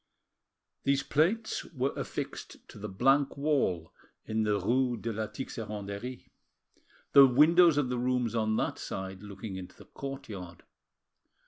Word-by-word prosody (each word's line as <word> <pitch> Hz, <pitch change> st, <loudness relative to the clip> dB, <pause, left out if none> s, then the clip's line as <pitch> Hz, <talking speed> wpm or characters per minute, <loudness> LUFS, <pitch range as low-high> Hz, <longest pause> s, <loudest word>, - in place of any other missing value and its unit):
These 140 Hz, 0 st, +2 dB
plates 195 Hz, +10 st, +1 dB
were 135 Hz, -3 st, -2 dB
affixed -, -, -6 dB
to -, -, -11 dB
the 105 Hz, +1 st, -5 dB
blank 135 Hz, +9 st, +2 dB
wall 135 Hz, -, 0 dB, 0.3 s
in 110 Hz, 0 st, -1 dB
the 105 Hz, -1 st, +1 dB
rue 120 Hz, +5 st, +1 dB
de 115 Hz, +1 st, -4 dB
la 110 Hz, +1 st, -2 dB
Tixeranderie, 105 Hz, 0 st, -6 dB, 0.9 s
the 140 Hz, -1 st, +9 dB
windows 160 Hz, +5 st, +6 dB
of 140 Hz, -4 st, +1 dB
the 125 Hz, -1 st, -1 dB
rooms 125 Hz, -2 st, 0 dB
on 110 Hz, -1 st, +1 dB
that -, -, -1 dB
side 95 Hz, 0 st, -5 dB
looking 100 Hz, -1 st, -7 dB
into 90 Hz, -1 st, -9 dB
the -, -, -15 dB
courtyard. 105 Hz, -11 st, -8 dB
120 Hz, 135 wpm, -30 LUFS, 105-140 Hz, 0.9 s, the